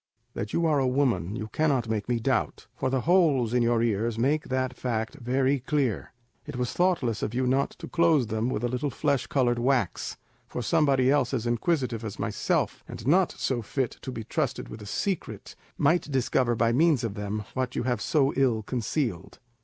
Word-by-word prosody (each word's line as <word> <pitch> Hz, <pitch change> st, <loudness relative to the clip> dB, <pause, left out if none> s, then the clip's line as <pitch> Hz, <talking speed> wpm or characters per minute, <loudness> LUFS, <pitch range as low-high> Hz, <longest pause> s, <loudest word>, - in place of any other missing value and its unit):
That 105 Hz, -, -4 dB
you 170 Hz, -, +1 dB
are 150 Hz, -3 st, +3 dB
a 130 Hz, -, +2 dB
woman 120 Hz, -9 st, +1 dB
you 110 Hz, -2 st, -4 dB
cannot 140 Hz, -6 st, +1 dB
make 110 Hz, 0 st, -2 dB
me 120 Hz, -1 st, +1 dB
doubt, 130 Hz, +1 st, -1 dB
for 130 Hz, -, -1 dB
the 130 Hz, -1 st, 0 dB
holes 150 Hz, -8 st, +3 dB
in 125 Hz, -, +3 dB
your 115 Hz, -1 st, +2 dB
ears 115 Hz, 0 st, 0 dB
make 145 Hz, +6 st, +1 dB
that 130 Hz, -1 st, 0 dB
fact 115 Hz, -3 st, -2 dB
very 130 Hz, +3 st, +1 dB
clear. 130 Hz, -5 st, -1 dB, 0.4 s
It 150 Hz, -, -6 dB
was 125 Hz, -1 st, -2 dB
thoughtless 160 Hz, -, +1 dB
of 110 Hz, -, -3 dB
you 130 Hz, +1 st, +1 dB
not 135 Hz, +2 st, +2 dB
to -, -, -8 dB
close 165 Hz, -6 st, +3 dB
them 110 Hz, +2 st, -1 dB
with 120 Hz, -, -2 dB
a -, -, +2 dB
little 125 Hz, +4 st, -2 dB
flesh 140 Hz, -1 st, 0 dB
coloured 120 Hz, -3 st, +1 dB
wax, 125 Hz, -5 st, 0 dB, 0.3 s
for 125 Hz, -, -4 dB
somebody 140 Hz, -5 st, +3 dB
else 135 Hz, -3 st, +2 dB
as 120 Hz, -2 st, -2 dB
inquisitive 120 Hz, -1 st, 0 dB
as 110 Hz, -3 st, -5 dB
myself, -, -, -1 dB
and 115 Hz, -, -8 dB
not 175 Hz, +6 st, +3 dB
so 125 Hz, -3 st, -1 dB
fit 125 Hz, +3 st, -2 dB
to 130 Hz, -, -5 dB
be 115 Hz, -3 st, -5 dB
trusted 135 Hz, +2 st, -2 dB
with 110 Hz, -, -9 dB
a 105 Hz, -, -9 dB
secret, 190 Hz, -, -3 dB, 0.2 s
might 160 Hz, +2 st, +2 dB
discover 130 Hz, -2 st, +1 dB
by 115 Hz, +1 st, +2 dB
means 145 Hz, 0 st, +3 dB
of 115 Hz, -3 st, -2 dB
them 105 Hz, +1 st, -4 dB
what 130 Hz, -1 st, -2 dB
you -, -, -1 dB
have 120 Hz, -4 st, -1 dB
so 140 Hz, +3 st, +2 dB
ill 125 Hz, -5 st, +2 dB
concealed. 120 Hz, -, -3 dB
125 Hz, 200 wpm, -27 LUFS, 115-140 Hz, 0.4 s, are